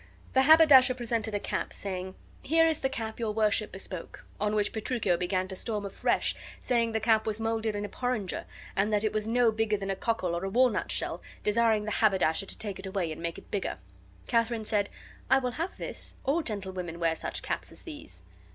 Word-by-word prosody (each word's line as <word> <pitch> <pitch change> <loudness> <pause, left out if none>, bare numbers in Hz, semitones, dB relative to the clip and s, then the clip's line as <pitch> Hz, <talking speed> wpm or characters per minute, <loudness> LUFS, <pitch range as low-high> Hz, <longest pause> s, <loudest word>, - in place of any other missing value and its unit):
The 265 - +5
haberdasher 280 -3 +7
presented 230 -3 -2
a - - +1
cap, - - -3
saying, 185 -1 -5 0.3
"Here 325 +3 +4
is 320 -2 +2
the 265 - 0
cap 225 -4 -4
your 220 -2 -1
worship 215 -1 +2
bespoke." 190 -2 -7
On 210 +1 +1
which 205 -1 +1
Petruchio 220 -4 0
began 185 +2 -1
to 190 - -5
storm 210 +1 -3
afresh, 195 - 0 0.3
saying 235 -2 +1
the 220 - +1
cap 220 0 +3
was 215 0 0
molded 225 -1 -1
in 205 0 -2
a - - -4
porringer 230 -3 -2 0.3
and 200 +2 +2
that 210 0 +2
it 215 - 0
was 215 0 -1
no 235 0 +4
bigger 220 -1 +1
than 195 0 -3
a - - -1
cockle 190 -5 -1
or 190 +3 -2
walnut 250 +3 +2
shell, - - -2 0.2
desiring 220 0 +3
the 215 - -2
haberdasher 195 -4 +2
to - - -5
take 200 -3 -5
it 190 - -6
away 190 -4 -1
and 155 - -7
make 170 0 -3
it - - -14
bigger. 200 - -2 0.5
Katharine 230 -2 +1
said, 205 -2 +1 0.4
"I 265 - +6
will 250 -2 -1
have 335 +8 -4
this; - - -2
all 295 +6 +2
gentlewomen 190 - -5
wear 165 -1 +2
such - - -4
caps - - -3
as - - -9
these." 305 -4 -8
215 Hz, 205 wpm, -29 LUFS, 195-235 Hz, 0.5 s, haberdasher